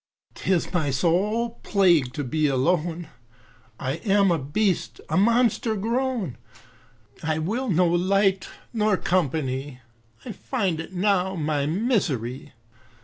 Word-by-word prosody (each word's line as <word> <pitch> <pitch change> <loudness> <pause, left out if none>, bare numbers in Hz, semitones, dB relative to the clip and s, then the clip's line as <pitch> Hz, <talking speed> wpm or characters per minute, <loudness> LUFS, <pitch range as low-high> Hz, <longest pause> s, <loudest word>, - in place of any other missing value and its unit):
'Tis 185 -1 -1
my 160 -5 +1
sole 205 - 0
plague 170 -10 +3
to 145 +3 -4
be 155 +4 0
alone, 165 +4 0 0.7
I 135 +3 -2
am 200 -1 +2
a 165 - +1
beast, 180 +7 -1
a - - -1
monster 230 +2 +2
grown, 230 - -2 0.8
I 160 -1 -1
will 225 +11 -2
no 180 -1 +3
light 190 +2 +2 0.2
nor 215 -3 +2
company, 140 -7 -1 0.5
I 245 - -5
find 195 -5 -2
it 160 - -7
now 190 0 +1
my 150 -3 -1
misery. 150 - -1
180 Hz, 120 wpm, -24 LUFS, 150-210 Hz, 0.8 s, plague